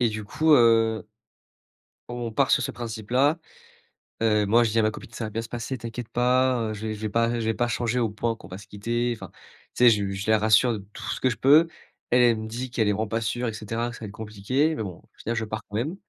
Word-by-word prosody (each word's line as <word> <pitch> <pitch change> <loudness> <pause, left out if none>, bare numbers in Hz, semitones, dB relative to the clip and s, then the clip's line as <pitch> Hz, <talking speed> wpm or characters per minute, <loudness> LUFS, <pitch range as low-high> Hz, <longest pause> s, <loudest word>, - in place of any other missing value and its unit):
et 120 - +3
du 110 0 -5
coup, 155 +9 +2
heu 115 -4 +4 1.0
On 120 -1 -4
part - - +2
sur - - +4
ce - - -2
principe 110 -2 -7
là. 140 +6 +3 0.9
Heu, 105 -2 +3
moi, 115 +4 +5
je 115 - 0
dis 115 - +2
à - - +5
ma 110 - +2
copine: 110 - -10
«Ca 115 - -4
va - - -4
bien 115 +2 -3
se - - -8
passer, 120 +2 -4
t'inquiète 115 0 -7
pas, 125 -1 +2
heu, - - -3
je 110 +1 -5
vais 110 - -2
je 105 - -11
vais 110 - -2
pas 115 +2 +1
je 115 - -2
vais 110 - +1
pas 120 +1 0
changer 120 +1 -1
au 115 -3 +1
point 115 +3 -2
qu'on 100 - -14
va 90 0 -8
se 105 - -13
quitter», 120 +4 -2
enfin, - - -10 0.4
tu - - +1
sais, - - +10
je 105 -2 +2
lui 100 0 -3
je 100 +3 -4
la 110 - +4
rassure 110 +3 +4
de 105 - -4
tout - - -9
ce - - -4
que 130 - +3
je 120 - -3
peux. 150 +5 +6 0.4
Elle, 125 +1 +4
elle 115 -2 +4
me 110 - -5
dit 120 +3 -5
qu'elle 110 -3 +1
est - - +3
vraiment 110 +2 -1
pas 115 +2 -2
sûre, 120 +3 -2
et 110 - -3
cetera, 115 +2 -3
que 120 - -10
ça - - -12
va - - -5
être - - -9
compliqué, 110 +9 -1
mais 110 - -4
bon, 95 -5 -5
au - - -22
final, 115 - -3
je 115 -1 -1
pars 110 +1 -5
quand 100 - -7
même. 150 - -2
115 Hz, 290 wpm, -25 LUFS, 110-120 Hz, 1.0 s, sais